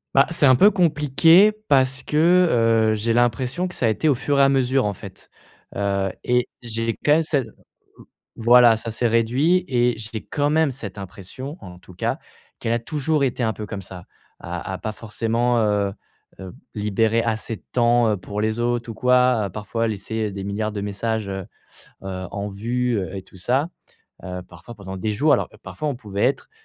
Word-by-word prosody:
Bah 135 Hz, 0 st, +6 dB
c'est 165 Hz, -3 st, +2 dB
un 130 Hz, -2 st, +7 dB
peu 200 Hz, +11 st, +7 dB
compliqué 165 Hz, +1 st, +4 dB, 0.2 s
parce 130 Hz, -1 st, +2 dB
que, 150 Hz, -9 st, +3 dB
heu, -, -, +2 dB
j'ai 110 Hz, +2 st, 0 dB
l'impression 125 Hz, +8 st, 0 dB
que 180 Hz, -, -10 dB
ça 120 Hz, -, 0 dB
a -, -, +3 dB
été 110 Hz, +8 st, 0 dB
au -, -, +5 dB
fur 140 Hz, +2 st, 0 dB
et 140 Hz, -, +6 dB
à 135 Hz, -, +5 dB
mesure, 130 Hz, -2 st, +2 dB
en 105 Hz, -, -1 dB
fait. -, -, -13 dB, 0.4 s
Heu, 100 Hz, -1 st, 0 dB
et 125 Hz, 0 st, +1 dB
j'ai 115 Hz, -1 st, -3 dB
quand 150 Hz, -, +5 dB
même 160 Hz, +1 st, +3 dB
cette, 140 Hz, -6 st, -1 dB
heu, -, -, -17 dB, 0.8 s
voilà, 120 Hz, 0 st, +6 dB
ça 115 Hz, +1 st, -6 dB
s'est 120 Hz, +2 st, 0 dB
réduit 130 Hz, +11 st, +2 dB
et 120 Hz, -2 st, +2 dB
j'ai 110 Hz, 0 st, -7 dB
quand 145 Hz, -1 st, -1 dB
même 160 Hz, -1 st, +3 dB
cette 105 Hz, -7 st, -8 dB
impression, 100 Hz, -, -8 dB
en 90 Hz, -1 st, -11 dB
tout 90 Hz, 0 st, -16 dB
cas, -, -, -2 dB, 0.4 s
qu'elle 115 Hz, -, -1 dB
a 120 Hz, -, +1 dB
toujours 150 Hz, +3 st, -1 dB
été 130 Hz, -1 st, -1 dB
un 110 Hz, -1 st, +1 dB
peu 105 Hz, -, -7 dB
comme 100 Hz, -2 st, -6 dB
ça. 90 Hz, -1 st, -11 dB, 0.3 s
À -, -, -6 dB
à -, -, -4 dB
pas 110 Hz, -, -4 dB
forcément, 115 Hz, +2 st, -1 dB
heu 105 Hz, -2 st, +1 dB, 0.5 s
heu, 95 Hz, -2 st, -8 dB, 0.2 s
libérer 110 Hz, +2 st, +1 dB
assez 110 Hz, 0 st, -2 dB
de -, -, -28 dB
temps, 120 Hz, -1 st, +3 dB
heu, 105 Hz, -, 0 dB
pour 100 Hz, +3 st, -6 dB
les 110 Hz, +2 st, -1 dB
autres 120 Hz, -1 st, -1 dB
ou -, -, -7 dB
quoi, 125 Hz, -3 st, +3 dB
à 100 Hz, -, -4 dB
parfois 110 Hz, +4 st, -3 dB
laisser, 110 Hz, +1 st, -3 dB
heu, -, -, -8 dB
des 100 Hz, 0 st, -6 dB
milliards 105 Hz, +2 st, -2 dB
de 105 Hz, -1 st, -5 dB
messages, 105 Hz, +1 st, -3 dB
heu 95 Hz, -1 st, -5 dB, 0.6 s
heu, 95 Hz, -1 st, -5 dB
en 100 Hz, 0 st, -4 dB
vue, 120 Hz, +4 st, -1 dB
heu, 95 Hz, +1 st, -4 dB
et 95 Hz, -, -6 dB
tout 95 Hz, -, -18 dB
ça, 135 Hz, -, 0 dB, 0.5 s
heu, 90 Hz, 0 st, -6 dB
parfois 90 Hz, +7 st, -12 dB
pendant 95 Hz, -2 st, -8 dB
des 105 Hz, +3 st, -2 dB
jours. 145 Hz, +7 st, +3 dB
Alors -, -, 0 dB
parfois, 155 Hz, -1 st, -4 dB
on 140 Hz, -, -3 dB
pouvait 100 Hz, -4 st, -4 dB
être 135 Hz, -, -1 dB
115 Hz, 205 wpm, -22 LUFS, 105-130 Hz, 0.8 s, un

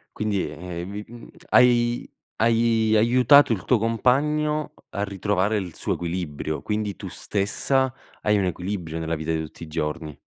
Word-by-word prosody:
Quindi 105 Hz, -3 st, -1 dB
,ehm, 85 Hz, +3 st, -7 dB
vi, 105 Hz, +1 st, -5 dB
uhm, 120 Hz, 0 st, -12 dB, 0.2 s
hai 120 Hz, -1 st, +4 dB, 0.3 s
hai 115 Hz, -1 st, +2 dB
aiutato 125 Hz, +5 st, +6 dB
il 100 Hz, -, -4 dB
tuo 125 Hz, -, +4 dB
compagno 150 Hz, +7 st, +1 dB, 0.2 s
a 100 Hz, -, -2 dB
ritrovare 100 Hz, +1 st, 0 dB
il 90 Hz, -5 st, -4 dB
suo -, -, -2 dB
equilibrio. 85 Hz, -3 st, -4 dB
Quindi 105 Hz, -3 st, -2 dB
tu -, -, -8 dB
stessa 130 Hz, +6 st, 0 dB, 0.3 s
hai 105 Hz, -1 st, +2 dB
un 100 Hz, -, +1 dB
equilibrio 90 Hz, -2 st, -4 dB
nella 80 Hz, 0 st, -2 dB
vita 80 Hz, +1 st, -3 dB
di 80 Hz, 0 st, 0 dB
tutti 80 Hz, +1 st, -9 dB
i 85 Hz, -, -8 dB
giorni. 75 Hz, -1 st, -4 dB
105 Hz, 155 wpm, -24 LUFS, 85-120 Hz, 0.3 s, aiutato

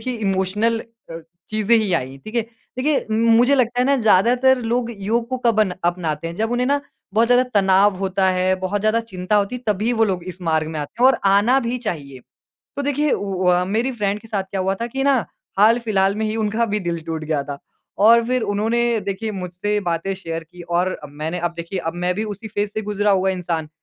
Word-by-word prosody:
देखिए 255 Hz, -1 st, -3 dB
इमोशनल 205 Hz, +2 st, 0 dB
अ, 230 Hz, -8 st, -12 dB, 0.3 s
चीज़ें 215 Hz, +2 st, +3 dB
ही 215 Hz, -4 st, 0 dB
आईं, 135 Hz, -4 st, -1 dB
ठीक 215 Hz, -, -9 dB
है। 235 Hz, -, +2 dB, 0.4 s
देखिए 285 Hz, +2 st, +2 dB
उम, 215 Hz, -, +1 dB, 0.2 s
मुझे 250 Hz, +4 st, +5 dB
लगता 245 Hz, -2 st, +1 dB
है -, -, +3 dB
ना 280 Hz, -, +3 dB
ज़्यादातर 245 Hz, +4 st, +4 dB
लोग 240 Hz, -1 st, 0 dB
योग 230 Hz, +4 st, -1 dB
को 255 Hz, -, -2 dB
कब 220 Hz, -2 st, +3 dB
अन 190 Hz, -4 st, +2 dB
अपनाते 165 Hz, -3 st, -1 dB
हैं? 165 Hz, -, -7 dB
जब 225 Hz, +1 st, -1 dB
उन्हें 245 Hz, +1 st, +1 dB
ना 285 Hz, +1 st, +2 dB, 0.3 s
बहुत 225 Hz, +2 st, +4 dB
ज़्यादा 245 Hz, 0 st, +5 dB
तनाव 195 Hz, 0 st, +4 dB
होता 190 Hz, 0 st, 0 dB
है, 185 Hz, 0 st, +1 dB
बहुत 195 Hz, +2 st, -1 dB
ज़्यादा 215 Hz, +2 st, +2 dB
चिंता 185 Hz, +3 st, 0 dB
होती 205 Hz, +4 st, 0 dB
है 250 Hz, -, -11 dB
तभी 215 Hz, +5 st, -1 dB
वो 225 Hz, -, +5 dB
लोग 185 Hz, -4 st, -2 dB
इस 185 Hz, -, -20 dB
मार्ग 160 Hz, -2 st, +1 dB
में 160 Hz, -1 st, -5 dB
आते 145 Hz, +11 st, -5 dB
हैं -, -, +8 dB
और -, -, 0 dB
आना 220 Hz, +7 st, +4 dB
भी 240 Hz, +2 st, -1 dB
चाहिए। 140 Hz, -7 st, -6 dB, 0.6 s
तो 285 Hz, -, -2 dB
देखिए 290 Hz, +1 st, 0 dB
उ -, -, -1 dB
उ 185 Hz, 0 st, -1 dB
अ, 180 Hz, 0 st, +3 dB
मेरी 225 Hz, +7 st, -1 dB
फ्रेंड 205 Hz, -3 st, -2 dB
के 225 Hz, -, -15 dB
साथ 205 Hz, -3 st, -1 dB
क्या 195 Hz, -, -2 dB
हुआ 190 Hz, +1 st, 0 dB
था 235 Hz, -, -1 dB
कि 270 Hz, +3 st, -3 dB
ना 275 Hz, -4 st, +3 dB, 0.3 s
हाल-फिलहाल 210 Hz, -3 st, +3 dB
में 220 Hz, +1 st, -2 dB
ही 215 Hz, -, -2 dB
उनका 220 Hz, +1 st, 0 dB
भी 210 Hz, -, +1 dB
दिल 170 Hz, -2 st, -2 dB
टूट 160 Hz, -1 st, -4 dB
गया 155 Hz, -2 st, -1 dB
था 140 Hz, 0 st, -7 dB, 0.5 s
और 235 Hz, +1 st, +6 dB
फिर 255 Hz, 0 st, 0 dB
उन्होंने 225 Hz, +3 st, +1 dB, 0.2 s
देखिए 200 Hz, +2 st, -3 dB
मुझसे 190 Hz, +2 st, -2 dB
बातें 175 Hz, +1 st, -2 dB
शेयर 165 Hz, -3 st, -6 dB
की 175 Hz, +2 st, -13 dB
और 175 Hz, +2 st, 0 dB
अ, 150 Hz, -, -9 dB
मैंने 155 Hz, +4 st, -5 dB
अब 175 Hz, 0 st, -2 dB
देखिए 170 Hz, +3 st, -5 dB
अब 165 Hz, -, -3 dB
मैं 180 Hz, 0 st, +1 dB
भी 215 Hz, +3 st, -2 dB
उसी 210 Hz, +1 st, -7 dB
फेज़ 205 Hz, 0 st, -2 dB
से 215 Hz, -, -2 dB
गुज़रा 205 Hz, 0 st, 0 dB
हुआ 190 Hz, 0 st, +2 dB
इंसान। 170 Hz, -4 st, -3 dB
205 Hz, 230 wpm, -21 LUFS, 180-230 Hz, 0.6 s, हैं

